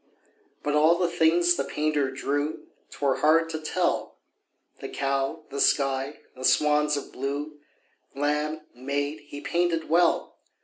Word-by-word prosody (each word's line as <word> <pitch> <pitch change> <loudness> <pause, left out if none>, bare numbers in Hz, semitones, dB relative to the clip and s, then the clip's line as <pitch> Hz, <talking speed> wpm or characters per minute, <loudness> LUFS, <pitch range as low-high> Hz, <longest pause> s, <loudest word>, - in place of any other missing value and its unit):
But 145 - 0
all 155 +3 +5
the 180 0 +1
things 170 +1 +3
the - - -1
painter 150 -2 0
drew 145 +3 -2 0.2
'Twere 140 -2 0
hard 165 +2 +3
to 155 - -3
tell 155 - -1 0.6
The - - -6
cow, 140 +3 -1
the 140 - -2
sky, 135 0 +1
the 130 - -9
swans 150 +1 +3
of 140 - -7
blue, 145 +3 -4 0.6
Lamb, 150 +2 -1
maid, 145 +4 -3
he 145 0 -8
painted 170 0 0
well. 170 +1 +2
150 Hz, 135 wpm, -26 LUFS, 140-160 Hz, 0.6 s, all